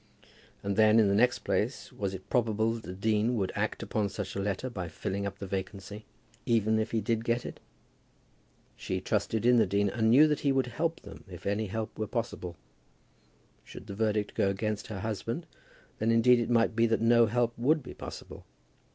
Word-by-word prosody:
And 100 0 -2
then, 110 +1 +6
in 105 -3 +4
the - - +2
next 125 +4 +3
place, - - -2
was 95 -1 -3
it 95 - -10
probable 115 -2 +1
that 115 - -6
the 90 - -6
dean 110 +4 +1
would 95 -4 -1
act - - -2
upon 105 -2 -1
such 100 -1 -5
a - - -2
letter 100 +5 -2
by 95 -8 -5
filling 100 +5 -3
up 100 0 -7
the 100 - -6
vacancy, 100 +2 -6 0.4
even 110 -2 +2
if 110 - -1
he 115 - 0
did 115 +2 -1
get 120 +1 0
it? - - -7 1.2
She - - -3
trusted 110 0 -1
in 125 0 +6
the 115 - +4
dean, 100 0 +1
and 110 -2 +1
knew 140 +7 +7
that 150 -1 0
he 140 - +1
would 135 -1 +2
help 160 +6 -2
them, 100 -1 -12
if 90 -2 -10
any 105 +2 0
help 110 +3 -4
were 110 - -1
possible. 110 -7 -4 1.1
Should - - -11
the 100 - -7
verdict 105 0 0
go 100 - +2
against 105 +1 -2
her 100 -4 -6
husband, 115 - -3 0.5
then 110 - +1
indeed 120 +2 +5
it 120 - -2
might 115 -1 +3
be 115 0 +4
that 115 0 +1
no 115 0 +5
help 120 +1 0
would 145 +5 +2
be - - -9
possible. - - -9
110 Hz, 205 wpm, -29 LUFS, 100-115 Hz, 1.2 s, knew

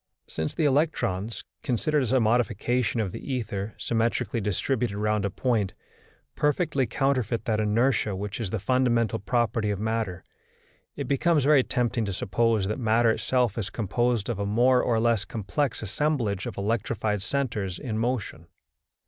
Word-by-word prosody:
Since 80 0 -4
the 160 - +1
electrons, 130 - 0 0.2
considered 145 +5 +1
as 125 - -1
a 130 - +4
modification 120 +1 +1
of 100 -4 -1
the 140 - -6
ether 110 -4 -3
symmetrically 115 0 0
distributed 105 +2 -1
round 105 -1 0
a - - 0
point, 110 -4 0 0.6
perfectly 150 -3 +1
counterfeit 130 -5 0
that 110 -2 +1
inertia 110 0 +1
which 100 +3 -5
is 110 -5 -2
the 110 - -1
fundamental 120 +1 +1
property 115 0 0
of 100 -2 -1
matter, 110 -5 -2 0.7
it - - -4
becomes 150 +2 +2
very 145 -1 +6
tempting 120 -2 -1
to 100 - -3
suppose 110 +2 +1
that 105 +5 -2
matter 115 0 +3
itself 120 -2 0
is 100 - -2
composed 120 0 0
of 115 -4 -2
a 100 - -1
more 125 +4 +4
or 115 -2 +1
less 115 -3 +2
complex 115 +5 -2
assemblage 110 -3 -1
of - - -6
electrified 105 0 -1
centres 105 -8 -2
in 110 -3 -3
motion. 115 -8 -2
115 Hz, 155 wpm, -26 LUFS, 105-125 Hz, 0.7 s, very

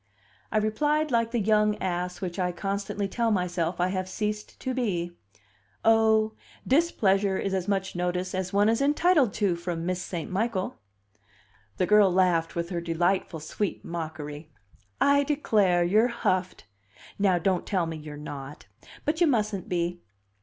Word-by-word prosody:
I - - +1
replied 295 +8 +1
like 230 -1 +2
the 235 0 -1
young 210 0 +3
ass 180 -1 -3
which 180 -1 -4
I 180 -1 +1
constantly 200 +2 -3
tell 230 +3 0
myself 180 -3 -1
I 180 +1 +2
have 185 0 -3
ceased 210 +1 -4
to 260 - -2
be: 185 -9 -1 0.7
"Oh, 220 -1 +4 0.3
displeasure 205 - +2
is 195 - -2
as 190 -1 -1
much 190 -2 -1
notice 180 +1 -2
as 185 -1 -2
one 205 +1 +3
is 230 +3 +2
entitled 295 - +3
to 200 -5 +1
from 170 -1 -4
Miss 180 0 -1
St. 175 -2 -5
Michael." 195 0 -1 1.0
The 185 - +2
girl 210 -1 +5
laughed 175 -3 +2
with 170 0 -2
her 170 -1 -2
delightful 170 0 0
sweet 190 +5 -3
mockery. 155 -2 -6 0.5
"I 280 0 +4
declare, 210 -12 +2
you're 215 +7 +4
huffed! 185 -6 -1 0.5
Now 195 -3 +3
don't 180 +1 0
tell 185 -4 +1
me 165 0 -4
you're 150 -1 -9
not. 145 -1 -8 0.4
But 315 +3 -1
you 345 - +6
mustn't 215 - 0
be. 175 0 -1
190 Hz, 155 wpm, -27 LUFS, 175-220 Hz, 1.0 s, you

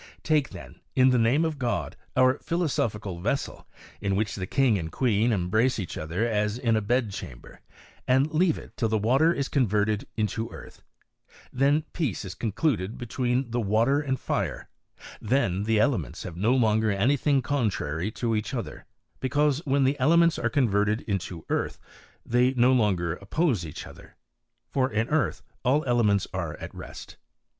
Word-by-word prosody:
Take 155 -3 +2
then, - - -11 0.2
in 130 0 +5
the 125 - +3
name 125 +8 +3
of 155 -3 -3
God, 120 -3 -2 0.2
our 130 +1 +4
philosophical 110 - -2
ves 115 +9 0
sel, - - -10 0.3
in 100 -1 0
which 105 0 -1
the 95 -1 -4
king 125 -5 +2
and 80 -1 -5
qteen 115 0 +2
embrace 110 +5 +1
each 95 -6 -5
other 85 +9 -2
as 105 -1 0
in 115 -3 +1
a 110 - +1
bedchamber, 105 - -3 0.5
and 135 +4 +2
leave 165 0 +3
it - - -12
till 115 - 0
the 110 0 +1
wStter 135 +10 +3
is 140 -1 -1
con 130 -5 +1
verted 105 +1 0
into 110 +1 -1
earth, - - -12 0.7
then 140 +4 +2
peace 140 - -2
is 90 - -6
concluded 110 - -1
between 125 +1 -1
the 120 +1 0
water 115 +7 +2
and 130 -3 -2
fire, - - -2 0.5
then 105 -5 0
the 110 -1 +2
elements 105 - 0
have 90 -3 -7
no 110 +8 +2
longer 110 -3 +2
anything 135 +6 +2
contrary 105 - -1
to 115 +1 -2
each 110 +5 -2
other; 115 - -6 0.3
because, 145 +3 +1
when 140 0 +3
the 135 +2 +1
elements 170 +5 +4
are - - 0
converted 105 -5 +1
into 95 -5 -4
earth - - -1 0.5
they 125 +2 +2
no 125 +1 +4
longer 95 -9 +1
op 100 - -14
pose 145 - +1
each 75 -3 -7
other; - - -14 0.6
for 130 -1 +1
in 110 +2 0
earth 150 -5 0 0.2
all 140 +4 +2
elements 110 -6 +2
are 85 -5 -3
at - - -8
rest. - - -10
115 Hz, 170 wpm, -26 LUFS, 105-135 Hz, 0.7 s, in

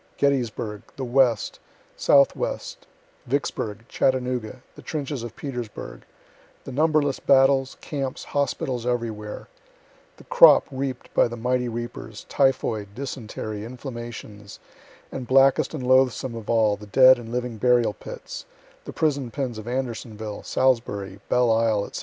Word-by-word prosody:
Gettysburgh, 120 -6 0
the 135 - -5
West, 125 -3 +2 0.4
Southwest 140 -1 +1 0.4
Vicksburgh 115 -5 -2
Chattanooga 125 -3 -1
the - - -13
trenches 145 -4 -4
of 120 -1 -7
Petersburgh 125 -6 -7 0.6
the - - -8
numberless 150 0 +2
battles, 135 -1 +3
camps, 135 -3 -4
hospitals 130 -3 -2
everywhere 115 -4 -3 0.7
the - - -15
crop - - +7
reap'd 130 -1 -4
by - - +4
the 120 0 -7
mighty 125 +1 0
reapers, 115 -2 -7
typhoid, 110 -7 0
dysentery, 110 -5 -5
inflammations 120 -4 -8 0.5
and 130 -2 -6
blackest 135 +2 +4
and 135 - -5
loathesomest 130 -1 +3
of 115 -2 -8
all, 110 -3 +3
the 105 +1 -12
dead 130 +3 +7
and 115 -1 -9
living 125 -1 -3
burial 120 -2 +3
pits, - - -9 0.4
the - - -7
prison 140 -5 0
pens 125 -3 -4
of 110 - -9
Andersonville, 115 -4 -4
Salisbury, 100 -7 0
Belle 125 -2 +3
Isle, 110 -2 +1
&c. - - -4
125 Hz, 130 wpm, -24 LUFS, 110-135 Hz, 0.7 s, crop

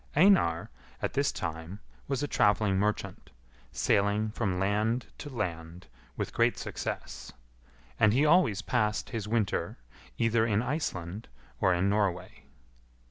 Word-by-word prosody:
Einar, 145 - +4 0.3
at - - -2
this - - +1
time, 80 +4 -5 0.3
was 135 0 -1
a - - 0
travelling 105 -5 +2
merchant, 105 +1 -2 0.4
sailing 105 +2 +1
from 100 -5 -1
land 105 +5 0
to 145 - -7
land 85 - -5 0.3
with - - -3
great - - +2
success; - - -5 0.7
and 110 - +5
he 135 +7 +3
always 155 - +4
passed 105 -4 0
his 110 -3 -4
winter 105 -3 -1 0.4
either 115 0 +2
in 110 -1 +1
Iceland 110 - -3 0.3
or 95 - +3
in 90 +3 +1
Norway. 100 -3 -1
105 Hz, 130 wpm, -29 LUFS, 95-115 Hz, 0.7 s, and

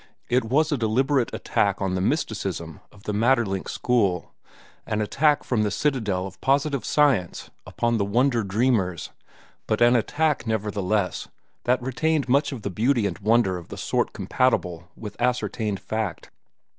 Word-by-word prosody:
It 125 0 +2
was 150 +7 +2
a 145 - 0
deliberate 130 +3 +1
attack 100 -1 0
on 95 -2 -1
the 90 - -1
mysticism 95 - -2
of 105 - -18
the 105 - -3
Maeterlinck 110 -3 +1
school—an 105 -1 -2
attack 145 +7 +2
from 120 -4 0
the 105 - +1
citadel 105 -7 -1
of 95 -1 -10
positive 140 -2 +1
science 130 - +1 0.2
upon 120 -1 0
the - - +2
wonder 120 +4 +2
dreamers, 100 -4 0 0.6
but 110 - 0
an 120 +1 +5
attack 145 +2 0
nevertheless 105 -2 -1 0.4
that 125 0 +2
retained 150 +3 0
much 140 +4 +2
of 125 -6 -7
beauty 120 +2 +2
and 95 -2 -3
wonder 105 -3 +2
of 85 - -13
the - - -9
sort - - -1
compatible 90 -9 -1
with 105 -2 -8
ascertained 110 -4 -1
fact. 110 -6 -4
110 Hz, 145 wpm, -24 LUFS, 100-130 Hz, 0.6 s, an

